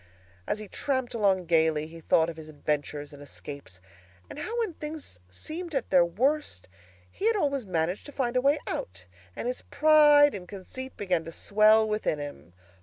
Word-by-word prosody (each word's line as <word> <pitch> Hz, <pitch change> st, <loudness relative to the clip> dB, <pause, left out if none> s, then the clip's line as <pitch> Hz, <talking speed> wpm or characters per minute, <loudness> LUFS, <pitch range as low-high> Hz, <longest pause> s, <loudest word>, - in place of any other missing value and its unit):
As -, -, 0 dB
he 215 Hz, -1 st, -8 dB
tramped 260 Hz, +2 st, -2 dB
along 195 Hz, -5 st, +2 dB
gaily, 160 Hz, -2 st, +2 dB
he 165 Hz, +1 st, -11 dB
thought 160 Hz, +1 st, +3 dB
of 170 Hz, -, -5 dB
his 155 Hz, -1 st, -10 dB
adventures 145 Hz, 0 st, -3 dB
and 145 Hz, -, -12 dB
escapes, 140 Hz, -8 st, -9 dB, 0.5 s
and -, -, -8 dB
how 460 Hz, +2 st, -4 dB
when 445 Hz, -7 st, -1 dB
things 300 Hz, -, -7 dB
seemed 320 Hz, -, -6 dB
at 265 Hz, -, -2 dB
their 180 Hz, -2 st, +6 dB
worst 240 Hz, -, -1 dB, 0.4 s
he 415 Hz, -, -1 dB
had 455 Hz, -, +3 dB
always 280 Hz, -, 0 dB
managed 175 Hz, -, -1 dB
to -, -, -9 dB
find 255 Hz, -3 st, -2 dB
a 250 Hz, -, +3 dB
way 280 Hz, +3 st, +4 dB
out; 90 Hz, 0 st, -5 dB, 0.3 s
and -, -, -4 dB
his 250 Hz, -, -3 dB
pride 295 Hz, -1 st, +6 dB
and 185 Hz, -3 st, -7 dB
conceit 235 Hz, +7 st, -8 dB
began 180 Hz, -5 st, 0 dB
to 165 Hz, -, -7 dB
swell 215 Hz, +5 st, +4 dB
within 210 Hz, -7 st, 0 dB
him. 115 Hz, -, -8 dB
205 Hz, 180 wpm, -28 LUFS, -, 0.5 s, their